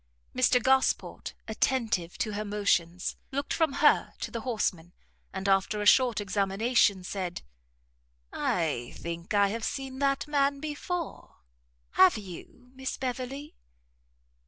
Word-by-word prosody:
Mr 255 0 +4
Gosport, 265 +2 +1
attentive 220 -6 0
to 215 - -2
her 210 +1 -2
motions, 190 -4 0
looked 280 +1 -2
from 320 -4 +1
her - - +4
to - - -4
the 230 - -4
horseman, 185 -8 -2 0.4
and 190 +1 -4
after 195 +2 +2
a 210 - -2
short 245 +1 +5
examination, 200 +1 +2
said, 180 -1 -4 0.9
"I 150 -9 -1
think 170 +4 -5
I 200 -1 +4
have 225 +2 -4
seen 270 0 -4
that 275 0 +1
man 280 -1 +1
before; 310 +3 -5 0.6
have 190 +3 +6
you, 210 +6 -11
Miss 265 0 -4
Beverley?" 265 +3 -4
220 Hz, 125 wpm, -29 LUFS, 190-265 Hz, 0.9 s, have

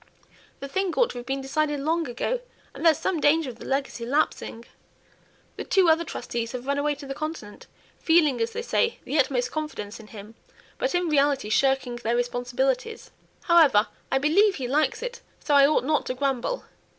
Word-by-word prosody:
The 275 - -5
thing 380 +6 -1
ought - - +3
to 245 - -7
have 245 - -10
been 270 0 -2
decided 295 +2 -1
long 325 +3 0
ago, 365 - -2 0.3
and - - -8
there's 325 -3 +5
some 355 -4 -1
danger 295 -2 +2
of 235 - -17
the - - -9
legacy 270 -3 -2
lapsing. 240 -3 -1 0.9
The - - -4
two 375 -4 +3
other 320 +1 +4
trustees 235 -6 -5
have 250 0 -6
run 280 +1 0
away 295 0 0
to 285 0 -11
the 275 - -5
Continent, 310 -8 -7 0.3
feeling, 305 -7 +3
as 230 - +1
they 465 - -5
say, 470 -1 0
the 300 - -1
utmost 250 -2 +1
confidence 300 -10 -5
in 220 - -13
him, 210 0 -11 0.5
but - - 0
in 355 0 +1
reality 280 -6 +2
shirking 255 +1 +1
their 235 0 -1
responsibilities. 250 - -2 0.3
However, 310 - +5 0.2
I 265 - +3
believe 380 +9 +3
he 260 -3 -4
likes 300 - 0
it, 485 -1 -6 0.2
so 295 - -1
I 280 -1 +7
ought 305 - +2
not 300 +2 0
to 255 - -2
grumble. 275 - -1
280 Hz, 190 wpm, -25 LUFS, 245-320 Hz, 0.9 s, I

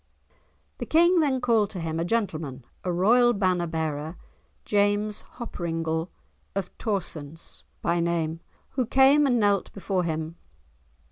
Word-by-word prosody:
The - - -4
King 345 +2 +5
then 280 -5 +2
called 225 -5 +3
to 195 - -6
him 165 -1 -3
a - - +1
gentleman, 160 - -2 0.2
a 180 - -1
royal 240 +7 +4
banner 185 -4 +1
bearer, 160 0 -3 0.5
James 205 +1 +1 0.2
Hoppringle 165 -7 -3 0.5
of 195 -2 -3
Torsonse 165 -7 -4 0.2
by 170 0 +1
name, 165 -1 -1 0.3
who 255 -4 -1
came 275 +3 +5
and 245 -3 +2
knelt 205 -2 +2
before 195 -2 -1
him. 160 0 -3
185 Hz, 130 wpm, -26 LUFS, 165-225 Hz, 0.5 s, King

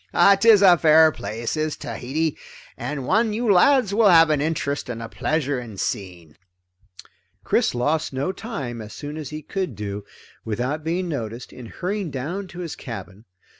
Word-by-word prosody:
"'Tis 215 -2 +6
a 180 -3 +7
fair 160 0 +6
place, 115 -2 -4
is 155 -1 -2
Tahiti, 150 +5 -3 0.4
and 145 -3 -5
one 215 - +2
you 220 -1 +2
lads 220 +2 +4
will 215 -1 +5
have 165 -3 +6
an 150 -2 +1
interest 145 -3 -2
and 115 -2 -4
a 115 - -6
pleasure 145 0 -1
in 115 -5 -9
seeing." 90 -6 -5 1.1
Chris - - +1
lost 150 +6 0
no 135 +6 -2
time, 140 - -6
as 105 0 -9
soon 145 0 -7
as 155 -2 -6
he 155 0 -7
could 185 - -3
do 100 0 -4
it - - -15 0.4
without 125 +8 -3
being 175 +3 -1
noticed, 120 -6 -5
in 125 -2 -10
hurrying 190 - -3
down 155 +9 -4
to 180 0 -9
his 170 -3 -5
cabin. 110 -4 -9
150 Hz, 170 wpm, -23 LUFS, 120-180 Hz, 1.1 s, a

